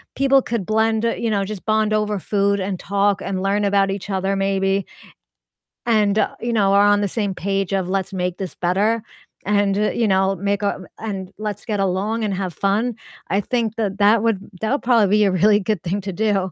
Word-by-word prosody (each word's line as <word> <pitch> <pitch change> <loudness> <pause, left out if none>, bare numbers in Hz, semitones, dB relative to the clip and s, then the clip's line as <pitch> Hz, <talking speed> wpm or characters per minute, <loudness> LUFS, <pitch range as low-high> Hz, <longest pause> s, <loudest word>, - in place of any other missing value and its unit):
people 275 0 +4
could 230 -7 -3
blend 220 +1 +1
you 230 - -1
know, 200 -2 +1
just 205 -1 -7
bond 215 -1 +1
over 210 -1 0
food 200 +1 0
and 190 -1 -3
talk 200 0 0
and 190 -1 -3
learn 200 +2 +1
about 195 -1 +2
each 195 +1 -6
other 195 0 0
maybe 195 0 0 1.0
and, 215 -3 +2
uh, - - 0
you 240 - -2
know, 195 -3 +3
are 200 +1 +5
on 205 0 +4
the 205 - +1
same 200 0 -2
page 195 0 -2
of 190 -2 0
"Let's 195 0 -2
make 180 -1 -2
this 190 -3 -6
better," 205 +6 +1 0.4
and, 205 -1 +2
you 215 +2 +1
know, 190 0 +2
make 200 +2 -1
a 200 -2 -1 0.2
and 195 -4 -5
let's 210 -1 -5
get 210 -3 -2
along 195 +4 -1
and 205 -2 -1
have 185 -2 -3
fun, 210 +6 0 0.3
I 195 - +2
think 225 0 -1
that 205 -3 -2
that 210 +2 +5
would 225 -4 +1 0.2
that 220 +3 -1
would 280 - 0
probably 235 -4 +4
be 210 - +4
a 195 - +2
really 205 +3 +4
good 210 -3 -2
thing 190 +3 -2
to 195 0 -5
do. 195 -2 0
200 Hz, 210 wpm, -21 LUFS, 195-215 Hz, 1.0 s, are